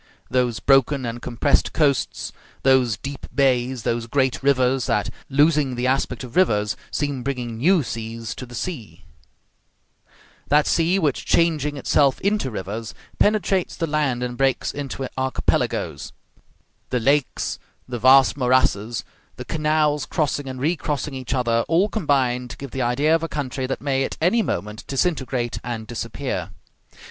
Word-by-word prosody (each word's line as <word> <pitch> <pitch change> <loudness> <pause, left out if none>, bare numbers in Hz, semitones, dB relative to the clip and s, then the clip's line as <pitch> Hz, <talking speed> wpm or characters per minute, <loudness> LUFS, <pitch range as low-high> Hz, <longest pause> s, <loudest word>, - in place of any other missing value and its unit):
Those 125 -2 +1
broken 135 0 +3
and 120 0 -4
compressed 125 +4 +1
coasts; 140 -5 0 0.3
those 130 -5 +4
deep 140 0 -7
bays; 130 -3 +2
those 115 -1 -1
great 130 +1 +1
rivers 130 -2 +2
that, 105 - 0 0.2
losing 145 -1 +3
the 120 +1 -2
aspect 135 +1 0
of 120 -2 -10
rivers, 105 - +2
seem 145 -3 -2
bringing 125 -3 -3
new 170 +4 +4
seas 115 -1 -5
to 125 - -8
the 120 - -10
sea; 110 - -6 1.4
that 150 +1 +4
sea 170 +3 +2
which, 150 -8 0
changing 150 -4 +1
itself 140 0 +2
into 200 -8 +1
rivers, 105 +1 -5 0.2
penetrates 200 -3 +2
the 165 - -1
land 145 -6 0
and 120 0 -4
breaks 135 -1 +1
it - - -7
into 135 -1 -4
archipelagoes; 130 0 -1 0.8
the 125 - 0
lakes, 140 +3 0 0.3
the 125 -1 -4
vast 130 +3 +6
morasses, 125 -4 +1 0.3
the - - -8
canals 150 -2 +1
crossing 145 -4 -1
and 130 -1 -6
recrossing 150 -1 -1
each 130 0 -3
other, 115 -2 +1
all 170 +6 +3
combine 130 - +1
to - - -9
give 140 -3 -8
the 135 - -3
idea 130 +6 +2
of 165 - +3
a 165 - -3
country 130 -2 -3
that 135 - -3
may 135 -1 0
at - - -4
any 185 +8 +3
moment 105 - -3
disintegrate 130 -5 -1
and 115 -2 -4
disappear. 115 0 -4
135 Hz, 150 wpm, -22 LUFS, 120-150 Hz, 1.4 s, vast